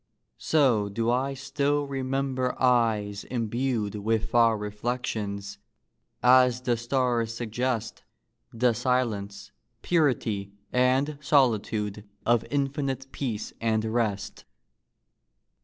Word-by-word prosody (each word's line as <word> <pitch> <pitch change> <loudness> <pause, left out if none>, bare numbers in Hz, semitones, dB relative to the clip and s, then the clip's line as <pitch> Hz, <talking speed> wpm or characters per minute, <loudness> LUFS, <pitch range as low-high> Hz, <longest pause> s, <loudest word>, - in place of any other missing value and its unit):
So 125 -10 +2
do 115 +3 0
I 135 +3 0
still 140 +2 0
remember 135 -1 -2
eyes 110 -5 +2
imbued 120 -2 -1
With 110 +1 -1
far 115 -2 +4
reflections 105 -2 -4 0.6
as 125 0 +5
the 125 -1 +1
stars 120 -1 0
suggest 115 0 -2 0.5
The 120 +1 +2
silence, 110 -5 -1 0.3
purity, 115 - +1 0.2
and 130 +4 +2
solitude 110 -7 +1 0.2
Of 120 -1 +3
infinite 135 -1 -2
peace 115 -6 -4
and 110 -1 +1
rest. 110 -3 -2
120 Hz, 90 wpm, -27 LUFS, 110-130 Hz, 0.6 s, as